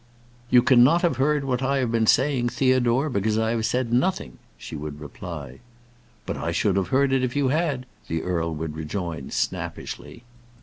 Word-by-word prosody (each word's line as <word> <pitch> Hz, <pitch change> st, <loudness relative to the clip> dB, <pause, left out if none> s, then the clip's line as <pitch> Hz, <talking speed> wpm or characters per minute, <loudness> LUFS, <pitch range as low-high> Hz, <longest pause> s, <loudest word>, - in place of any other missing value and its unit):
"You 125 Hz, -1 st, +6 dB
cannot 130 Hz, +8 st, +5 dB
have 165 Hz, -8 st, +2 dB
heard 145 Hz, +2 st, +2 dB
what 130 Hz, -2 st, -1 dB
I 135 Hz, +1 st, +1 dB
have 125 Hz, -4 st, 0 dB
been 115 Hz, -1 st, +1 dB
saying, 130 Hz, -2 st, +3 dB
Theodore, 130 Hz, +1 st, +2 dB
because 110 Hz, -4 st, 0 dB
I 110 Hz, 0 st, +1 dB
have 115 Hz, -1 st, 0 dB
said 125 Hz, -2 st, -1 dB
nothing," 125 Hz, -, 0 dB, 0.2 s
she -, -, -8 dB
would 75 Hz, -1 st, -6 dB
reply. 75 Hz, -2 st, -8 dB, 0.7 s
"But -, -, -4 dB
I 85 Hz, -, -2 dB
should 95 Hz, +3 st, +1 dB
have 95 Hz, -2 st, 0 dB
heard 135 Hz, +5 st, +2 dB
it 130 Hz, -1 st, +2 dB
if 125 Hz, 0 st, -2 dB
you 140 Hz, -2 st, +2 dB
had," 145 Hz, -3 st, 0 dB, 0.2 s
the 80 Hz, 0 st, -2 dB
earl 85 Hz, -2 st, -1 dB
would 80 Hz, 0 st, -5 dB
rejoin, 80 Hz, -2 st, -4 dB
snappishly. 115 Hz, -, -4 dB
120 Hz, 180 wpm, -24 LUFS, 85-135 Hz, 0.7 s, You